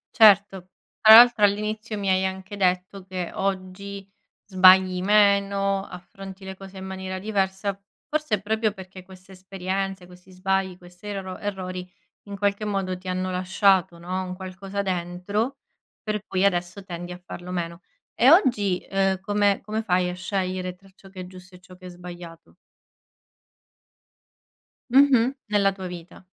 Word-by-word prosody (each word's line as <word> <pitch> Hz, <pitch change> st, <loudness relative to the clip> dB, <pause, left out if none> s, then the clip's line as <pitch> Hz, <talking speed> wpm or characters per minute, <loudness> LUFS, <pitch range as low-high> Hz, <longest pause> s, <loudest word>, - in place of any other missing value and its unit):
Certo. 200 Hz, -4 st, +5 dB, 0.3 s
Tra 220 Hz, 0 st, +10 dB
l'altro 240 Hz, -2 st, +8 dB
all'inizio 215 Hz, +2 st, 0 dB
mi 200 Hz, -1 st, -3 dB
hai 190 Hz, 0 st, +2 dB
anche 190 Hz, +1 st, -4 dB
detto 185 Hz, 0 st, -1 dB
che 185 Hz, -2 st, -5 dB
oggi 195 Hz, +1 st, -4 dB, 0.4 s
sbagli 185 Hz, -1 st, +5 dB
meno, 200 Hz, -1 st, +3 dB
affronti 190 Hz, +1 st, -11 dB
le 190 Hz, 0 st, -7 dB
cose 195 Hz, 0 st, -12 dB
in 190 Hz, -, -7 dB
maniera 190 Hz, 0 st, -5 dB
diversa, 195 Hz, 0 st, -1 dB, 0.3 s
forse 305 Hz, -6 st, 0 dB
è 195 Hz, -, -8 dB
proprio 220 Hz, 0 st, 0 dB
perché 190 Hz, -1 st, -11 dB
queste 185 Hz, +1 st, -16 dB
esperienze, 190 Hz, 0 st, -4 dB
questi 180 Hz, +1 st, -17 dB
sbagli, 190 Hz, 0 st, -1 dB
questi 180 Hz, +2 st, -14 dB
erro 195 Hz, -2 st, -5 dB
errori, 185 Hz, -2 st, -5 dB, 0.4 s
in 200 Hz, 0 st, -7 dB
qualche 200 Hz, +1 st, 0 dB
modo 195 Hz, -3 st, -2 dB
ti 185 Hz, +1 st, -12 dB
hanno 185 Hz, 0 st, -2 dB
lasciato, 185 Hz, -1 st, +2 dB
no, 180 Hz, +2 st, -4 dB
un 185 Hz, 0 st, -6 dB
qualcosa 190 Hz, +1 st, -5 dB
dentro 190 Hz, +7 st, -2 dB, 0.5 s
per 210 Hz, -1 st, -2 dB
cui 190 Hz, +1 st, +1 dB
adesso 175 Hz, 0 st, -1 dB
tendi 175 Hz, -1 st, -7 dB
a 180 Hz, -, -7 dB
farlo 180 Hz, 0 st, -10 dB
meno. 170 Hz, -1 st, -4 dB, 0.3 s
E 245 Hz, +4 st, +5 dB
oggi, 215 Hz, -, +3 dB
ehm, 195 Hz, -1 st, +1 dB
come 205 Hz, 0 st, +1 dB
come 215 Hz, +2 st, -3 dB
fai 180 Hz, -4 st, +1 dB
a -, -, -4 dB
scegliere 185 Hz, -1 st, -3 dB
tra 195 Hz, +1 st, -21 dB
ciò 195 Hz, 0 st, -17 dB
che 190 Hz, -1 st, -9 dB
è -, -, -7 dB
giusto 185 Hz, 0 st, -14 dB
e -, -, -15 dB
ciò 185 Hz, 0 st, -16 dB
che 185 Hz, 0 st, -12 dB
è -, -, -8 dB
sbagliato? 175 Hz, -1 st, -11 dB, 2.4 s
Mh-mh. 265 Hz, -1 st, +5 dB
Nella 205 Hz, -1 st, +2 dB
tua 190 Hz, -1 st, -7 dB
vita. 175 Hz, +1 st, -10 dB
190 Hz, 155 wpm, -24 LUFS, 185-200 Hz, 2.4 s, Tra